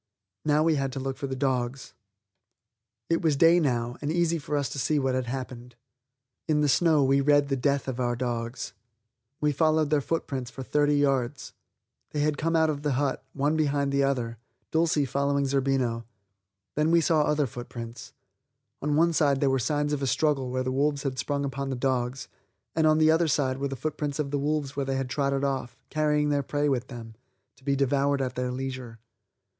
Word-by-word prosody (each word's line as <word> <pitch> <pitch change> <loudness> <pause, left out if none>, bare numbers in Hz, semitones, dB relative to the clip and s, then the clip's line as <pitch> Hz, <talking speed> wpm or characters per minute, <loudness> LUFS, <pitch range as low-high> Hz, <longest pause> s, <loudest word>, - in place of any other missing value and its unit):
Now 150 0 +3
we 160 -2 +3
had 135 -1 -1
to 135 - -4
look 135 0 -3
for 140 - -4
the 130 - -3
dogs. 130 -1 -2 1.1
It 165 - +1
was 160 -3 +2
day 165 +4 +6
now 120 -5 -1
and 145 +1 -1
easy 170 0 +1
for 145 +1 -2
us 140 -2 0
to 140 - -5
see 150 +3 +1
what 135 -2 +1
had 130 -1 -1
happened. 125 -1 -6 0.7
In 150 -2 +2
the 150 - +3
snow 155 +1 +4
we 135 +1 +3
read 145 0 +3
the 135 - +1
death 140 +1 0
of 130 -1 -3
our 120 -1 0
dogs. 120 0 -3 0.7
We 150 0 +2
followed 155 +1 +2
their 150 -2 +3
footprints 135 -5 -3
for 135 +1 -8
thirty 145 +2 +2
yards. 135 -2 0 0.6
They 150 - 0
had 150 0 0
come 165 +1 0
out 160 -1 +4
of 145 -1 -5
the 145 -2 0
hut, 135 +1 -1
one 145 +2 +1
behind 145 -2 +1
the 140 0 +2
other, 120 -5 -1 0.3
Dulcie 160 -3 +2
following 140 +1 0
Zerbino. 135 -4 0 0.7
Then 150 +1 +1
we 170 0 +5
saw 160 -1 +3
other 150 0 +2
footprints. 120 -1 -8 0.7
On 145 +1 0
one 170 +2 +3
side 140 -3 +3
there 135 -1 +2
were 135 - +2
signs 145 +4 0
of 145 - -1
a 135 - 0
struggle 135 -2 +1
where 130 0 -1
the 130 - -2
wolves 140 +2 0
had 130 -2 -3
sprung 140 -1 -1
upon 135 0 -3
the 135 - -2
dogs, 125 0 -1 0.5
and 160 -1 +3
on 155 0 +4
the 155 0 +5
other 165 +1 +3
sides 135 -3 0
were 140 - -1
the 135 - -5
footprints 150 +1 -3
of 145 -3 -2
the 145 - 0
wolves 145 -1 -1
where 140 - -1
they 135 0 0
trotted 135 +2 -1
off, 130 -3 -2
carrying 150 -1 +1
their 145 -1 +2
prey 145 +2 -1
with 130 -3 0
them, 115 -3 -9 0.4
to 130 - -24
be 140 0 +1
devoured 140 +1 +1
at 130 -1 -2
their 125 0 -2
leisure. 130 -2 -5
140 Hz, 205 wpm, -27 LUFS, 130-150 Hz, 1.1 s, day